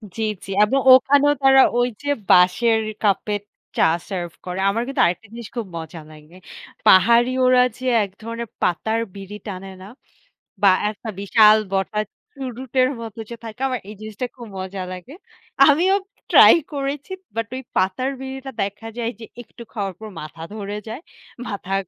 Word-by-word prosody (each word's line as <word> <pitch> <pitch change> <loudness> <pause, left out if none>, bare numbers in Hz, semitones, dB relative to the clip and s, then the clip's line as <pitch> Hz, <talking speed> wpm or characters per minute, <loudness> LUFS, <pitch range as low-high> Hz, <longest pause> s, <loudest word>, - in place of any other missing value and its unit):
জ্বী, 225 - -2 0.2
জ্বী। 195 - -8
এবং 270 +6 +2
ওখানেও 285 +2 +5
তারা 270 0 +7 0.2
ওই 245 - +3 0.2
যে 285 - -3 0.2
বাঁশের 220 +6 +4 0.2
কাপের 205 0 +1 0.4
চা - - +4 0.2
সার্ভ 175 -4 -4
করে। 180 +1 -4
আমার 225 +4 -1
কিন্তু 275 -1 0
আরেকটা 180 +5 -2
জিনিস 235 -2 -8
খুব 235 -3 -3
মজা 165 0 -8
লাগে। 155 +3 -16 0.5
পাহাড়ি 235 +6 +6
ওরা 255 0 +5 0.2
যে 260 - -8 0.2
একধরনের 230 +4 -8
পাতার 220 +6 0 0.2
বিড়ি 200 +1 -8
টানে 195 0 -6
না? 190 - -10 0.8
বা 195 - +8 0.2
একটা 215 +2 -8
বিশাল 215 +1 +6 0.2
বটা 195 +2 -1 0.3
চুরুটের 255 -1 -1
মতো 225 -1 -8
যে 235 - -6
থাকে 225 +3 -9
আমার 255 -2 -2
এই 215 - -9
জিনিসটা 215 +3 -5
খুব 235 -2 -9
মজা 190 0 -5
লাগে। 185 - -10 0.5
আমিও 345 +7 +4 0.4
ট্রাই - - +9 0.2
করেছি। 280 +3 -4 0.2
বাট 225 0 -2
ওই 260 - -5
পাতার 190 +9 0
বিড়িটা 265 0 -7
দেখা 205 +3 -6
যায় 235 -1 -2
যে 225 - -8 0.2
একটু 235 +1 -13
খাওয়ার 200 -4 -3
পর 220 -1 -8
মাথা 155 +1 -10
ধরে 205 0 -5
যায়। 225 +7 -6 0.5
মাথা 195 -1 -5
220 Hz, 160 wpm, -21 LUFS, 195-255 Hz, 0.8 s, ট্রাই